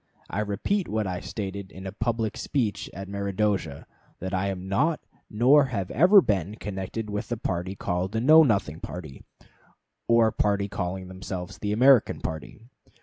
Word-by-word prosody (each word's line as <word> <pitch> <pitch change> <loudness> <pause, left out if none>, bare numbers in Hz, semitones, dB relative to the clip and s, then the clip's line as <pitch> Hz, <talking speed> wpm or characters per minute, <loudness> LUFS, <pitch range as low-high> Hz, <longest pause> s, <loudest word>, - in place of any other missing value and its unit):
I 100 - -2
repeat 105 - -1
what 110 0 -1
I 90 -2 -3
stated 100 -2 -6
in 95 +1 -10
a 95 - -4
public 110 +1 -2
speech 120 -8 -2
at 95 0 -8
Meredosia, 100 -5 -2 0.3
that 95 +2 -5
I 95 +1 0
am 95 -1 -4
not, 150 +11 +1 0.3
nor 130 +6 +4
ever 100 -7 -3 0.3
have - - -9
been, 100 0 0
connected 105 +1 -5
with 105 0 -4
the 120 - -2
party 90 -1 -3
called 90 +1 -2
the 110 - -1
Know 155 +7 +7
Nothing 100 - +1
party, 80 -8 -8 0.9
or 115 -1 +4
party 100 -1 0
calling 95 -1 -4
themselves 95 0 -7
the 105 - -2
American 125 +2 +5
party. 80 -1 -6
100 Hz, 160 wpm, -26 LUFS, 95-110 Hz, 0.9 s, Know